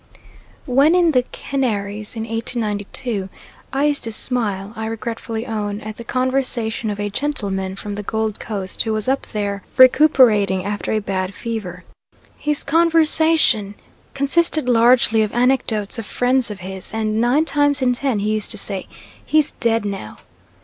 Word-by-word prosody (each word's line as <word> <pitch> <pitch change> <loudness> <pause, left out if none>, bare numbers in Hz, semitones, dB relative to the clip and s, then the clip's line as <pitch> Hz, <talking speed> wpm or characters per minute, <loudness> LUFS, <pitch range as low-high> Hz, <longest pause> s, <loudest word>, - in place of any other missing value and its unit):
When 280 +5 +4
in 345 -2 +4
the 255 -4 +3
Canaries 210 -6 -3
in 225 - -3
1892, 220 -2 -3 0.4
I 275 +2 +1
used 290 -1 +1
to 225 - -3
smile, 215 -4 -1
I 220 0 -4
regretfully 225 0 -4
own, 210 -3 -3
at 215 0 -7
the 235 - -8
conversation 255 -3 -1
of 205 0 -4
a 205 0 -2
gentleman 195 -8 -2
from 205 +1 -6
the 205 - -4
Gold 220 0 -2
Coast 195 -4 -4
who 220 - -1
was 215 +1 -2
up 270 +1 0
there 200 -1 -3 0.2
recruiting 245 -9 +5
after 205 0 -3
a 220 - +1
bad 195 -2 -3
fever. 205 -7 -5 0.5
His 300 -1 -2
conversation 315 -8 +3 0.4
consisted 300 +1 +1
largely 235 -1 +5
of 215 -1 -1
anecdotes 240 -4 +1
of 225 - -6
friends 250 0 +1
of 205 -3 -7
his, 190 +3 -7
and 220 0 0
nine 260 +7 +3
times 290 -3 +1
in 250 -1 +3
ten 255 -2 -1
he 210 +1 -1
used 215 -1 +1
to 215 - -1
say, 200 -1 -4 0.4
"He's 310 -1 +2
dead 230 -3 0
now." 195 - -5
225 Hz, 155 wpm, -20 LUFS, 205-260 Hz, 0.5 s, recruiting